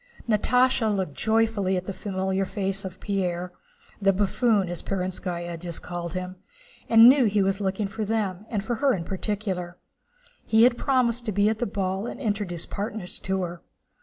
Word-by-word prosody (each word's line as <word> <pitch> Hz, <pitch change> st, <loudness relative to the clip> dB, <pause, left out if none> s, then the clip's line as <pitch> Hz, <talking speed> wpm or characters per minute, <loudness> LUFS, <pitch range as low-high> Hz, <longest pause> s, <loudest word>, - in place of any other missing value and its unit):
Natásha 240 Hz, +2 st, +3 dB
looked 190 Hz, -7 st, -2 dB
joyfully 220 Hz, -2 st, +1 dB
at 180 Hz, -, -4 dB
the 195 Hz, -, -4 dB
familiar 190 Hz, -1 st, -2 dB
face 195 Hz, 0 st, -2 dB
of 190 Hz, -1 st, -7 dB
Pierre, 180 Hz, -3 st, -2 dB, 0.5 s
"the 195 Hz, 0 st, +5 dB
buffoon," 205 Hz, +1 st, +2 dB
as 175 Hz, 0 st, -4 dB
Perónskaya 180 Hz, -2 st, -3 dB
had 170 Hz, -2 st, -4 dB
called 175 Hz, -1 st, -5 dB
him, 185 Hz, 0 st, -4 dB, 0.5 s
and 225 Hz, 0 st, +9 dB
knew 265 Hz, 0 st, +7 dB
he 205 Hz, -1 st, +2 dB
was 195 Hz, +1 st, 0 dB
looking 195 Hz, +1 st, -1 dB
for 215 Hz, +2 st, -4 dB
them, 210 Hz, -2 st, -2 dB
and 210 Hz, -4 st, -2 dB
for 235 Hz, +2 st, -2 dB
her 275 Hz, -2 st, +3 dB
in 175 Hz, -, -4 dB
particular. 190 Hz, -2 st, -3 dB, 0.7 s
He 220 Hz, 0 st, +4 dB
had 245 Hz, 0 st, +5 dB
promised 240 Hz, -3 st, +1 dB
to -, -, +1 dB
be 205 Hz, +1 st, +3 dB
at 220 Hz, 0 st, -2 dB
the 240 Hz, -, 0 dB
ball 195 Hz, +1 st, -2 dB
and -, -, -6 dB
introduce 205 Hz, -8 st, -2 dB
partners 205 Hz, -2 st, -3 dB
to 190 Hz, -1 st, -1 dB
her. 175 Hz, -1 st, -6 dB
195 Hz, 175 wpm, -25 LUFS, 185-220 Hz, 0.7 s, and